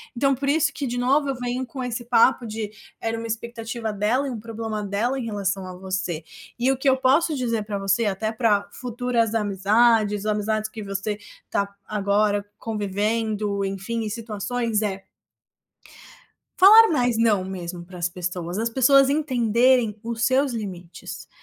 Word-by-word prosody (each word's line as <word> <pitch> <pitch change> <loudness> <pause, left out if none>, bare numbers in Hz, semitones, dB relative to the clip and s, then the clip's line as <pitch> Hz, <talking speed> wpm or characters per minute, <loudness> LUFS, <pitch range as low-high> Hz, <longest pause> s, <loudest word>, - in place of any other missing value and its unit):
Então 275 +2 +2
por 275 +2 -4
isso 320 +2 +3
que, 295 -4 -4
de 240 - -3
novo, 275 +4 +2
eu 270 - -1
venho 245 +1 -3
com 255 0 -6
esse 240 -1 -4
papo 240 +1 +4
de 215 -1 -4 0.3
era 225 0 -2
uma 230 - -5
expectativa 230 0 -4
dela 220 +7 +1
e - - -3
um 235 - -5
problema 220 -1 -5
dela 215 +7 -1
em 245 - -4
relação 195 -3 -2
a 185 0 -8
você, 185 -3 -3 0.4
e 260 +2 +3
o 270 - 0
que 270 +2 -2
eu 265 - +4
posso 290 +5 +3
dizer 230 -4 -1
pra 205 -1 -3
você, 195 +4 +1
até 210 +2 -1
pra 215 -3 +1
futuras 245 -2 -1
amizades, 210 +1 +2
amizades 215 +1 0
que 215 -1 -8
você 195 +1 -3 0.3
tá 200 - 0 0.2
agora 205 0 +1
convivendo, 210 -1 -1
enfim, 195 +4 -3
em 215 - -3
situações, 225 +1 -2
é 195 -2 -3 1.6
falar 435 +4 +9
mais 245 -6 +1
"não", 215 -5 +3
mesmo 180 -2 -6
para 180 0 -11
as 175 0 0
pessoas, 180 +1 -4
as 230 +1 0
pessoas 270 +2 +5
entenderem 245 -5 +2
os 230 -1 -2
seus 265 +1 +2
limites, 185 -6 -7
225 Hz, 165 wpm, -24 LUFS, 200-245 Hz, 1.6 s, falar